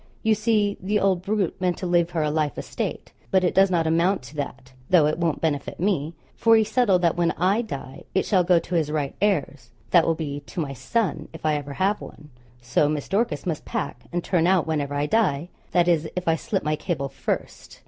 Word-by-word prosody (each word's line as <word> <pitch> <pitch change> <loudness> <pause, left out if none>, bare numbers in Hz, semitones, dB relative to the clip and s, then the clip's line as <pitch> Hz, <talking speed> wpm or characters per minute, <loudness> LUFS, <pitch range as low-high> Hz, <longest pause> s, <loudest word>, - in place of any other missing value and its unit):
You 220 - +4
see, 210 -1 +1
the 205 +3 +1
old 190 -2 +2
brute 195 -2 -1
meant 180 -1 +1
to - - -5
leave 175 -1 +2
her 165 -3 -1
a 150 - 0
life 150 -2 -1
estate; - - -4 0.2
but 190 -1 +3
it 180 - +2
does 195 0 +5
not 170 -3 +1
amount 170 +1 +2
to 130 +4 -12
that, 130 -2 -6 0.2
though 170 -5 +6
it 155 +2 0
won't 165 -3 0
benefit 145 -4 -2
me, 170 -4 0 0.2
for 225 0 +5
he 220 - +5
settled 210 -5 +2
that 170 - +3
when 170 -1 +1
I 190 +6 +2
die 140 - -7
it 190 - +2
shall 185 -3 +3
go 175 0 +4
to 165 +2 -3
his 160 -3 +1
right 145 -3 -1
heirs 145 - 0 0.2
that 170 -3 +5
will 165 - +2
be 145 -3 -4
to 145 +4 -8
my 145 -4 -2
son, 165 - -1
if 160 - -9
I 155 - +3
ever 145 -1 -3
have 195 +6 0
one. 150 0 -12 0.3
So 125 +5 +2
Miss 150 -2 -2
Dorcas 195 -7 0
must 165 -5 -2
pack, 230 -3 -4
and 175 0 -2
turn 175 -2 +2
out 185 -3 +3
whenever 145 -3 -2
I 145 +1 0
die, 175 -5 +1 0.2
that 175 -1 +2
is, 160 -2 +2
if 180 -1 -4
I 165 - +4
slip 190 +4 -2
my 155 0 0
cable 150 -4 -3
first. - - -5
170 Hz, 230 wpm, -24 LUFS, 150-190 Hz, 0.3 s, though